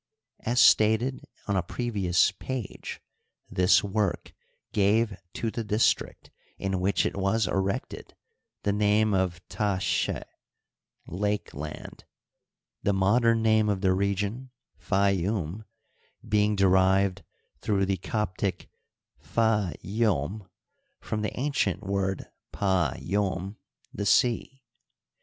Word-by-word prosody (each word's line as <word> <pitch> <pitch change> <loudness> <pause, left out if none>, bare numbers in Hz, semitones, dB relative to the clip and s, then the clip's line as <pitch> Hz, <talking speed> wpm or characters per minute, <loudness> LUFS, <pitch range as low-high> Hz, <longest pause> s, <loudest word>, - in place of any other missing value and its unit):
As 120 +2 0
stated 110 +5 +4 0.2
on 100 - 0
a 95 - +2
previous 100 -2 +1
page, 125 +2 -6 0.5
this 90 0 +4
work 100 -1 -1 0.4
gave 105 +1 +2 0.2
to 115 - -2
the 115 - -3
district 105 +1 0 0.3
in 95 -1 -2
which 95 +2 +1
it - - -1
was 100 +3 +1
erected 95 0 -3 0.5
the 100 - +1
name 105 +1 +2
of 90 -2 -1
Ta'ske, 100 -3 -1 0.8
Lake 105 +4 -2
land 75 +2 -8 0.2
" - - -58
— - - -64
the 100 - +1
modem 115 +4 +3
name 110 -1 +3
of 100 -2 -1
the 95 -2 +3
region, 100 +6 -1 0.3
Fayoum, 100 0 0 0.6
being 105 0 +2
derived 95 0 +3 0.4
through 100 +2 +1
the 95 0 0
Co^iic 100 0 -3 0.5
pka 110 -5 +1
ySmylrova 105 +1 -3
the 105 - -3
ancient 110 - 0
word 95 -1 -1 0.3
pa 95 -8 +1
ySm, 95 0 -2 0.2
" - - -40
the 100 - -3
sea." 125 +4 +2
100 Hz, 110 wpm, -27 LUFS, 95-110 Hz, 0.8 s, stated